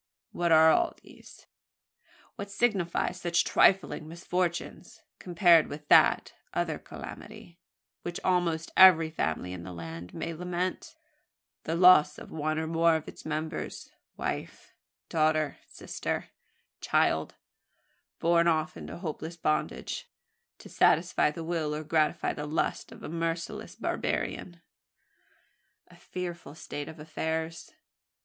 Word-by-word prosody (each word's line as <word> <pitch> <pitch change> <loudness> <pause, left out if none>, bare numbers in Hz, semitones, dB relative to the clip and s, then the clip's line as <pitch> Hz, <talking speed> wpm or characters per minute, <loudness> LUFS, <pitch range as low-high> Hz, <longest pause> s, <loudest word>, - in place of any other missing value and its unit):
what 175 -1 0
are 160 0 +7
all 345 -1 +2
these? - - -16 0.9
What 200 0 -7
signify 200 -5 0
such 175 -1 0
trifling 185 -4 +3
misfortunes, 175 +1 -4 0.2
compared 175 -2 +4
with 150 0 -9
that - - +5 0.2
other - - -1
calamity, 170 0 -11 0.4
which 175 0 -5
almost 170 -3 0
every 165 -4 +7
family 90 - -2
in 90 - -7
the 90 - -8
land 85 0 -8
may 170 - -4
lament 180 - -4 0.7
the 160 - -1
loss 170 -4 +6
of - - -11
one 155 0 -2
or 160 - -1
more 165 0 +3
of 160 - -4
its - - -10
members 155 +1 -4 0.3
wife, - - -5 0.3
daughter, 155 -2 +1
sister, - - -5 0.5
child - - +1 0.8
borne 170 0 +3
off 155 -2 +1
into - - -8
hopeless 165 -1 -6
bandage, 155 -1 -2 0.5
to - - -13
satisfy - - +3
the 160 +2 -6
will, 160 -3 -2
or 155 - -4
gratify 155 0 +1
the 150 - -5
lust, 155 +2 -2
of - - -13
a - - -5
merciless 165 +1 -4
barbarian?" 175 -2 -3 1.3
"A - - -17
fearful 175 -4 -7
state 145 -2 -6
of 160 - -10
affairs!" 160 +1 -4
165 Hz, 125 wpm, -29 LUFS, 155-175 Hz, 1.3 s, are